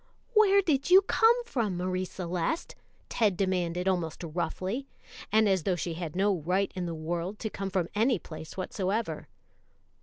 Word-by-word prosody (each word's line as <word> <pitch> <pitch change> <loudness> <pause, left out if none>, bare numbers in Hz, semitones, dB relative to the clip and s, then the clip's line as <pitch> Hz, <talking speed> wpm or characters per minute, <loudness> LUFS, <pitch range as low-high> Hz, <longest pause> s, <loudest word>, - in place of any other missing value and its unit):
"Where 400 -2 +5
did 290 -4 +1
you 380 +2 +8
come 465 +4 +4
from, 225 - -1
Marie 185 +1 -1
Celeste?" 180 - -3 0.3
Ted 210 -6 +1
demanded 180 -2 0
almost 175 -3 -1
roughly, 185 - -3 0.4
and 220 0 +4
as 190 -2 +2
though 185 +3 0
she 170 0 -3
had 165 -1 -5
no 195 0 +2
right 185 +5 0
in 180 -2 -3
the 165 - -4
world 170 +5 -3
to 220 -1 -4
come 195 0 -4
from 185 -3 0
any 230 +3 +2
place 160 -1 -10
whatsoever. 195 +4 -2
190 Hz, 160 wpm, -29 LUFS, 175-220 Hz, 0.4 s, you